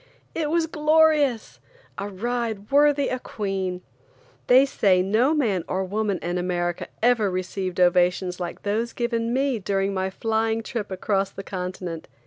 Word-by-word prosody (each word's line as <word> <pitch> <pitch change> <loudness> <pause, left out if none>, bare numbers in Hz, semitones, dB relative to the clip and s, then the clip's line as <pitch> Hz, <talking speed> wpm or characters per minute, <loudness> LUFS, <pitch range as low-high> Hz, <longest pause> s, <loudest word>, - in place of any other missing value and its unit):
It 310 -2 -1
was 330 +1 +2
glorious! 305 -5 +2 0.4
A 200 +1 -4
ride 225 +1 -3
worthy 285 0 +4
a 255 - -2
queen. 190 -5 -3 0.6
They 255 +2 +7
say 190 -9 +2
no 230 +10 +2
man 210 - +1
or 190 +1 -1
woman 205 0 -1
in 175 +1 -1
America 175 -1 -2 0.2
ever 235 -4 +3
received 185 0 -3
ovations 180 0 +2
like 175 -1 -6
those 220 +3 -1
given 235 -1 -1
me 265 -1 +1
during 195 0 -1
my 190 0 -1
flying 225 +2 -1
trip 220 -2 -4
across 195 0 -1
the 195 - -9
continent. 180 -3 -5
205 Hz, 145 wpm, -24 LUFS, 185-245 Hz, 0.6 s, They